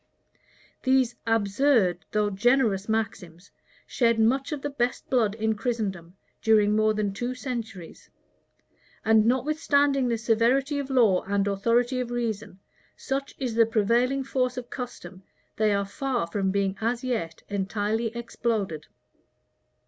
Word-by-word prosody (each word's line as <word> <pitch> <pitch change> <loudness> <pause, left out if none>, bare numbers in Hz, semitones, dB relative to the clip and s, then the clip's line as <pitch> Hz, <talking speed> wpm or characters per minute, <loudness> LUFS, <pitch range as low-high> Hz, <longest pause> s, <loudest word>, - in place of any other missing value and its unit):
These 260 -2 +2
absurd, 215 - +2
though 210 -1 +1
generous 215 -1 +2
maxims, 200 -5 -3 0.3
shed 230 -2 +1
much 265 +7 +2
of 295 -3 -4
thee 290 - -1
best 245 -2 -1
blood 225 -5 +2
in 220 0 0
Christendom, 200 -7 -3 0.2
during 210 -1 +4
more 215 0 +2
than 205 -2 -1
two 245 +5 -3
centuries; 230 -9 -7 1.0
and 220 0 +4
notwithstanding 280 +1 +2
the 235 -1 0
severity 245 +6 +1
of 280 -1 -5
law 230 -9 +4
and 200 0 +1
authority 235 +6 +1
of 250 -1 -3
reason, 220 -5 -3 0.4
such 275 0 -4
is 255 -4 -3
the 230 0 +4
prevailing 235 +5 +1
force 255 -1 -1
of 245 -1 -7
custom, 190 -8 -7 0.4
they 215 -1 +2
are 200 0 +1
far 255 - -2
from 190 +3 -1
being 195 0 0
as 235 +2 -1
yet 170 -11 -3
entirely 205 +3 -1
exploded. 215 -9 -3
225 Hz, 135 wpm, -26 LUFS, 200-250 Hz, 1.0 s, during